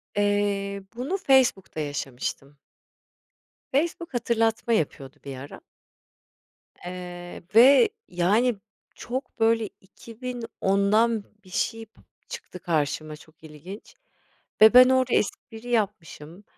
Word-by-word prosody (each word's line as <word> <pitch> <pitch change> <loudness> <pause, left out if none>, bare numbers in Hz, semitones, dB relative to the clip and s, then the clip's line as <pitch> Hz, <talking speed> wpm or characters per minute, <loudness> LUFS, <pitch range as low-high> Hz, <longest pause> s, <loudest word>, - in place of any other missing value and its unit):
Eee, 205 -1 0
bunu 275 +11 -2
Facebook'ta 260 - +2
yaşamıştım. 140 -1 -5 1.2
Facebook 335 +2 -1
hatırlatma 230 -1 0
yapıyordu 140 - -2
bir 135 -2 -7
ara 135 +2 -10 1.2
eee, 180 0 -8
ve, 275 - +7 0.2
yani, 210 +8 +2 0.4
çok, 260 +3 -6
böyle, 225 -1 +2
2010'dan 225 -1 -1 0.2
bir 185 - -18
şey 225 +4 -2
p 220 - -26 0.3
çıktı 470 - -8
karşıma 155 -2 -2
çok 155 +1 -20
ilginç 160 +7 -11 0.7
ve 220 +2 +8
ben 255 +1 +9
orada 260 -1 +2
espri 225 +3 -3
yapmışım 195 -5 -3
205 Hz, 100 wpm, -25 LUFS, 175-240 Hz, 1.2 s, ben